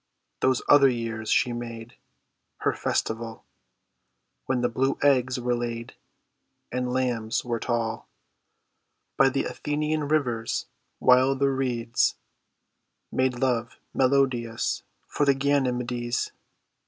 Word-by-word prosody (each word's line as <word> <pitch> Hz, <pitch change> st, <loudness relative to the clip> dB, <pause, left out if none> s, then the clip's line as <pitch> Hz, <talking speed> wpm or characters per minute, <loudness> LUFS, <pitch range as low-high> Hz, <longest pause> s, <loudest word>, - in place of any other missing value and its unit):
Those 130 Hz, -1 st, +2 dB
other 140 Hz, -2 st, +7 dB
years 115 Hz, -3 st, -3 dB
she 125 Hz, -, +3 dB
made 115 Hz, -1 st, -7 dB, 0.7 s
Her -, -, +2 dB
festival 115 Hz, 0 st, -2 dB, 1.0 s
When 130 Hz, -2 st, +1 dB
the 120 Hz, -, +3 dB
blue 135 Hz, +3 st, 0 dB
eggs 130 Hz, -3 st, +3 dB
were 125 Hz, 0 st, 0 dB
laid 120 Hz, 0 st, -4 dB, 0.8 s
And 125 Hz, 0 st, -1 dB
lambs 120 Hz, -4 st, -1 dB
were 120 Hz, -1 st, -1 dB
tall, 115 Hz, -1 st, -2 dB, 1.1 s
By 135 Hz, -, +5 dB
the 135 Hz, -, 0 dB
Athenian 150 Hz, 0 st, -2 dB
rivers 125 Hz, -7 st, 0 dB, 0.3 s
while 130 Hz, +2 st, +5 dB
the 140 Hz, 0 st, +2 dB
reeds 120 Hz, -3 st, 0 dB, 1.0 s
Made 130 Hz, -1 st, +1 dB
love 120 Hz, -2 st, 0 dB, 0.2 s
melodious 130 Hz, -4 st, +1 dB, 0.3 s
for -, -, -1 dB
the 140 Hz, -1 st, +4 dB
Ganymedes. 125 Hz, -4 st, 0 dB
125 Hz, 105 wpm, -26 LUFS, 120-135 Hz, 1.1 s, other